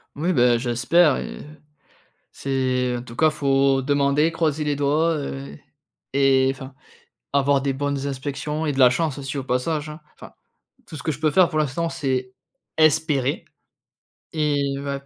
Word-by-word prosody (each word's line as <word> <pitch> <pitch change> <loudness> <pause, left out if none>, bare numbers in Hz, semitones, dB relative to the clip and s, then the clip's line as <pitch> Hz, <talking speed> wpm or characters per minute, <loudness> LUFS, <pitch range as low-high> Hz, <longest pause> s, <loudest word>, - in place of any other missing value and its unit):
Oui, 170 +5 0
ben 120 -4 +4
j'espère 135 +7 +2
et - - -6 0.9
c'est 130 -2 -1
en 120 - -7
tout 115 -2 -11
cas, 155 +5 +4
faut 135 -2 +2
demander, 145 +3 +2
croiser 155 -2 -1
les 145 -1 0
doigts, 150 +4 +1
heu, 140 -1 -6 0.6
et 135 -1 +3
enfin, 135 0 -10 0.6
avoir 140 0 +3
des 140 0 0
bonnes 140 0 -2
inspections 145 +3 -4
et 150 - 0
de - - -7
la 125 -1 +8
chance 150 +2 -1
aussi 140 0 -5
au 135 - -3
passage, 145 +4 -1
hein. 150 +1 -10
Enfin, - - -13 0.5
tout 155 - -9
ce - - -8
que 160 - -1
je 140 - -8
peux 155 -1 +2
faire 180 +2 +5
pour 155 - -2
l'instant, 155 +3 -1
c'est 130 -5 -2 0.5
espérer 150 -3 +2 0.9
et 145 -3 0
bah 140 0 -4
140 Hz, 165 wpm, -22 LUFS, 135-155 Hz, 0.9 s, la